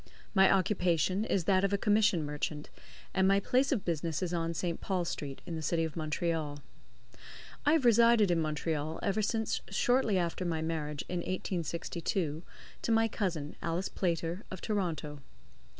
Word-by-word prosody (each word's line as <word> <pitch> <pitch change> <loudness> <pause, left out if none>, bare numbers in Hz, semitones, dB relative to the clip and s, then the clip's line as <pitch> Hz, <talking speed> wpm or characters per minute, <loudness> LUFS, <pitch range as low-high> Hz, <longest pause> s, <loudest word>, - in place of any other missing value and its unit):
My 190 -2 +6
occupation 185 0 +2
is 195 -5 0
that 190 +1 +3
of 195 0 +1
a - - +3
commission 205 -6 +3
merchant, 150 0 -4 0.4
and 190 0 +3
my 195 +1 +5
place 255 +6 +2
of 240 -8 0
business 165 0 -1
is 180 -1 -2
on 165 -1 -1
St. 170 +1 -2
Paul 185 -3 -1
Street, 140 -4 -5
in 170 -2 -5
the 160 - -4
City 165 +1 +1
of 160 -2 -4
Montreal. 155 -2 -2 1.1
I 295 - +6
have 315 -6 +2
resided 230 -3 +6
in 170 -1 +2
Montreal 155 0 -2
ever 205 +2 +1
since 220 +1 -1
shortly 225 +1 +2
after 175 0 -1
my 165 -3 -1
marriage, 150 -3 -3
in 180 - -2
1862, 170 -2 -2 0.4
to - - -1
my 225 0 +4
cousin, 175 -9 -3
Alice 170 +3 -1
Playter, 170 0 -1
of 190 - -6
Toronto. 165 -9 -2
175 Hz, 165 wpm, -31 LUFS, 160-200 Hz, 1.1 s, My